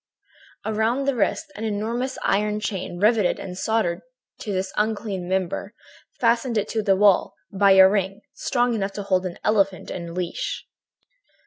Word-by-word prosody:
"Around 220 +5 0
the 275 - +2
wrist, 295 +7 -1
an 215 - -6
enormous 225 +4 -2
iron 210 +1 +1
chain, 195 -4 -4
riveted 210 0 +3
and 180 -2 -7
soldered 190 -3 0 0.4
to 210 - -5
this 190 0 -2
unclean 210 -4 -2
member, 190 +3 -2 0.4
fastened 235 0 +2
it 210 - 0
to 220 - 0
the 200 -2 +3
wall 200 -1 +3 0.2
by 200 0 +5
a 190 0 +9
ring, 195 +1 -1
strong 245 -2 0
enough 200 -3 -2
to 205 - -5
hold 185 -1 +1
an 175 - -8
elephant 195 -3 +1
in 170 -1 -6
leash. 180 -2 -3
205 Hz, 155 wpm, -23 LUFS, 190-220 Hz, 0.4 s, a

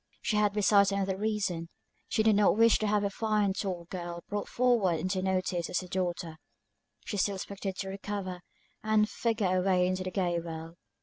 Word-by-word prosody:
She 215 - 0
had 210 -1 +3
besides 200 -1 +4
another 195 -1 0
reason, 200 -5 -2 0.4
she 220 - +2
did 220 -1 +4
not 205 0 +4
wish 230 0 +5
to 215 - 0
have 205 0 +2
a 200 - 0
fine 210 -2 +1
tall 185 -3 -3
girl 175 -2 -5
brought 205 0 -3
forward 230 -9 +2
into 185 +2 -1
notice 185 -2 -1
as 180 - 0
her 185 - -9
daughter; 175 -3 -3 0.7
she 205 - -3
still 200 +1 +1
expected 195 0 -5
to 190 +1 -4
recover, 195 -2 -5 0.4
and 215 0 +3
figure 215 -5 0
away 185 -1 +3
in 185 - +1
the 185 0 -3
gay 175 -2 0
world. 165 0 -7
195 Hz, 185 wpm, -30 LUFS, 180-210 Hz, 0.7 s, wish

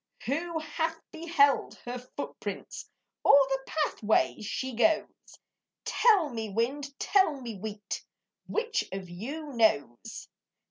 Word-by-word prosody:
Who 325 +7 -1
hath 320 +1 -2
beheld 325 -4 +2
her 245 +1 -4
footprints, 250 - -6 0.3
Or - - +7 0.2
the 270 0 +1
pathway 240 -11 +1
she 260 +5 -3
goes? 315 +8 +3 0.8
Tell 405 -10 +4
me, 225 -4 -4
wind, 270 +7 -2
tell 380 -8 +3
me, 235 -4 -6
wheat, 205 +1 -5 0.4
Which 450 -1 0
of 190 -2 -6
you 280 - -6
knows? 145 - +1
275 Hz, 110 wpm, -29 LUFS, 220-320 Hz, 0.8 s, Or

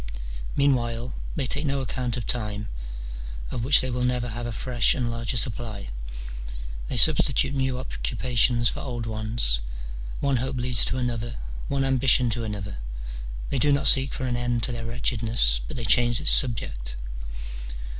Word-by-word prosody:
Meanwhile 120 -3 +1 0.2
they 140 - -1
take 145 +4 0
no 140 0 +1
account 125 -2 -2
of 120 - -3
time, 105 -3 -1 0.8
of 115 - -2
which 135 +3 +7
they 130 - -2
will 125 +1 -1
never 125 -1 0
have 120 +1 -4
a - - -3
fresh 120 +2 +2
and 120 -3 -1
larger 115 +2 -2
supply: 115 - -3 1.0
they - - -3
substitute 135 0 +4
new 130 -2 0
occupations 120 -1 +1
for - - -1
old 120 -4 -4
ones, 110 - 0 0.6
one 140 -2 +2
hope 130 +2 -2
leads 125 -1 +5
to - - -1
another, 120 -2 -2 0.3
one 140 -1 +1
ambition 130 -2 +4
to 115 +1 -1
another: 100 - -4 0.7
they - - 0
do 145 - +4
not 140 0 +3
seek 135 0 +6
for 130 - -3
an 125 -1 0
end 120 -1 0
to 125 - +1
their 115 -1 -4
wretchedness, 115 - +2
but - - -6
they 120 - -3
change 120 +2 +4
its - - +5
subject. - - 0
120 Hz, 165 wpm, -26 LUFS, 115-130 Hz, 1.0 s, which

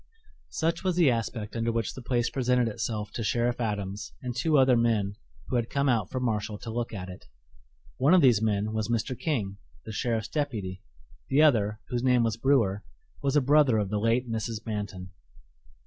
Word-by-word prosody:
Such 165 +1 -1
was 185 -2 +1
the 170 -7 +5
aspect 115 -2 -3
under 115 0 0
which 115 -3 -2
the 130 - -9
place 120 -1 0
presented 125 -2 +2
itself 105 -1 -3
to 115 - -4
Sheriff 120 +2 0
Adams 105 -2 -3
and 125 -1 -4
two 150 +5 +2
other 130 -2 +5
men 110 -4 +1 0.3
who 125 - 0
had 120 -1 -1
come 140 0 0
out 115 -7 +1
from 130 -1 -3
Marshall 105 -2 -1
to 115 - -7
look 120 +1 -3
at 95 -4 -6
it. 90 0 -11 0.7
One 150 +7 +5
of 180 - +6
these 120 -5 +5
men 105 0 0
was 110 -1 -1
Mr. 120 +2 -1
King, 110 -9 -2 0.3
the - - -6
sheriff's 115 -1 -1
deputy; 105 -11 -3 0.5
the 140 +3 +4
other, 110 -7 +3
whose 120 -1 -1
name 125 -2 +3
was 115 -2 0
Brewer, 115 -6 +2 0.4
was 140 0 0
a 150 - +5
brother 140 -3 +4
of 105 -2 0
the 105 - 0
late 115 +3 +1
Mrs. 115 0 -4
Manton. 100 -4 -5
115 Hz, 195 wpm, -28 LUFS, 105-130 Hz, 0.7 s, of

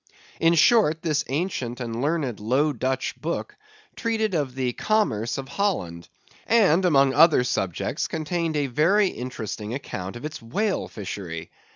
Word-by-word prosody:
In 165 +1 +4
short, 165 -3 +4
this 155 -4 +1
ancient 135 -5 -2
and 115 -1 -4
learned 145 -6 -1
Low 130 +8 +1
Dutch 130 +1 -2
book 170 - -3 0.4
treated 220 -3 -1
of 140 -6 -1
the 130 -2 -1
commerce 120 - 0
of 135 -1 -5
Holland; 130 - -2 0.4
and, 190 -6 +4
among 140 -5 +4
other 155 -2 +6
subjects, 95 -8 -2
contained 160 0 -2
a 145 - +1
very 175 - +3
interesting 115 -3 -5
account 95 -7 -6
of 120 +5 -7
its 155 -3 -6
whale 195 - -1
fishery. 95 -5 -6
145 Hz, 145 wpm, -24 LUFS, 120-170 Hz, 0.4 s, other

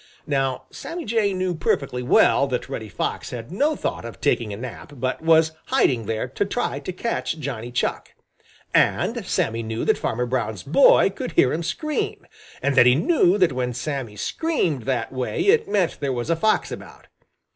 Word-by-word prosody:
Now 135 -3 -1
Sammy 340 +1 -6
Jay 215 -2 +1
knew 185 -1 -1
perfectly 140 -5 -1
well 135 +2 +4
that 125 -2 -3
Reddy 110 -2 -6
Fox - - -3
had 120 +3 -7
no 290 - +1
thought - - -3
of 115 -1 -8
taking 110 -3 +1
a 100 - -5
nap 130 +4 -8
but 130 0 -2
was 160 0 +4 0.2
hiding 115 -5 +2
there 110 -1 -2
to - - -1
try 205 +5 -2
to - - -5
catch 185 -3 -2
Johnny 120 -6 -5
Chuck. 120 - -2 0.6
And - - +2
Sammy 115 +1 0
knew 110 0 -3
that - - +2
Farmer 125 +2 -1
Brown's 120 -6 -2
boy - - +5
could - - -6
hear - - +4
him 165 - -1
scream, 300 - -3 0.4
and 140 - +2
that 125 -2 +6
he 125 - +6
knew 185 - +3
that 180 -8 +3
when 125 -1 -2
Sammy 125 -4 -4
screamed 170 - -1
that 130 -2 -1
way 130 - -2
it 430 +3 +3
meant 185 -5 +1
there 140 -2 -1
was 125 +5 -2
a - - +3
fox 215 +6 +1
about. - - -10
135 Hz, 185 wpm, -23 LUFS, 120-185 Hz, 0.6 s, that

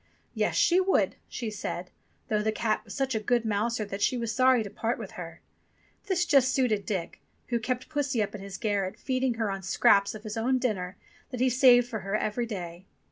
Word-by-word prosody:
"Yes, - - 0
she 355 +1 +4
would," 375 0 +2
she 230 -4 -4
said, 180 -3 -5 0.4
though 210 -1 +1
the 220 +1 +1
cat 215 0 -1
was - - -9
such 270 -2 0
a 220 - 0
good 235 +2 +1
mouser 220 +1 0
that 200 0 -6
she 250 - +2
was 230 -2 -2
sorry 255 -1 +4
to 205 - -7
part 230 +1 -2
with - - -7
her. - - -9 0.7
This 365 -2 +1
just 270 -5 +4
suited 230 -7 +1
Dick, 185 -6 -3 0.3
who 240 -1 +1
kept 250 +2 -3
pussy 285 -5 -1
up 205 - -5
in 210 - -7
his 195 0 -7
garret, 200 -4 -1
feed 260 -1 -2
ing 245 -3 +1
her 220 -3 -1
on 195 0 -4
scraps 200 +2 +3
of 215 - -9
his 215 0 -5
own 255 +3 +2
dinner 200 -7 -2 0.3
that 250 - -6
he 255 0 +3
saved 245 -1 +6
for 225 -3 -4
her 195 +1 -3
every 215 +3 -1
day. 180 -3 -7
225 Hz, 220 wpm, -28 LUFS, 205-255 Hz, 0.7 s, saved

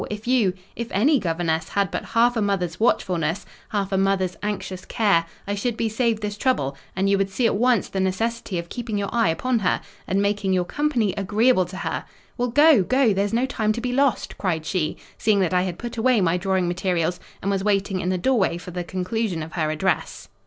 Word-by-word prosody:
if 210 +1 -6
you—if 220 -2 0
any 270 +9 +3
governess 165 -3 -1
had 200 -4 0
but - - -3
half 235 +2 +2
a 225 - 0
mother's 190 -5 -1
watchfulness—half 190 0 -1
a 190 - +1
mother's 190 -2 +1
anxious 195 -3 -4
care, 200 -7 +2 0.2
I 200 - -1
should 230 +3 -2
be 225 - 0
saved 225 -1 0
this 205 0 -3
trouble; 140 - +1 0.2
and 190 +2 +1
you 200 0 +3
would 195 0 +1
see 230 +5 -1
at 230 - +3
once 240 -1 +2
the 195 - -4
necessity 195 +1 -1
of 170 0 -4
keeping 225 +1 -4
your 200 -1 -3
eye 230 -7 +3
upon 245 +9 0
her, 190 - +1 0.3
and 195 - +1
making 200 -1 +1
your 180 -1 +1
company 250 -7 0
agreeable 205 +1 +2
to— 185 +2 -4 0.3
Well, 245 0 0
go—go; 260 - +5
there's 200 +1 0
no 235 +3 +2
time 215 -5 0
to 235 - -4
be 250 0 -2
lost," 275 -2 +1
cried 165 -5 -1
she, 160 -3 -1 0.2
seeing 215 -2 +3
that 185 -1 +1
I 180 - +3
had 180 -2 -3
put 240 +2 -6
away 245 0 +3
my 175 -3 +2
drawing 185 0 0
materials, 175 -1 0 0.2
and 200 - -1
was 195 -1 0
waiting 195 -2 +1
in 180 - -1
the 185 - +1
doorway 200 -4 +1
for 180 +1 -9
the 175 0 -3
conclusion 185 +1 -2
of 155 - -9
her 155 -3 0
address. 160 +3 -2
200 Hz, 210 wpm, -23 LUFS, 180-230 Hz, 0.3 s, go—go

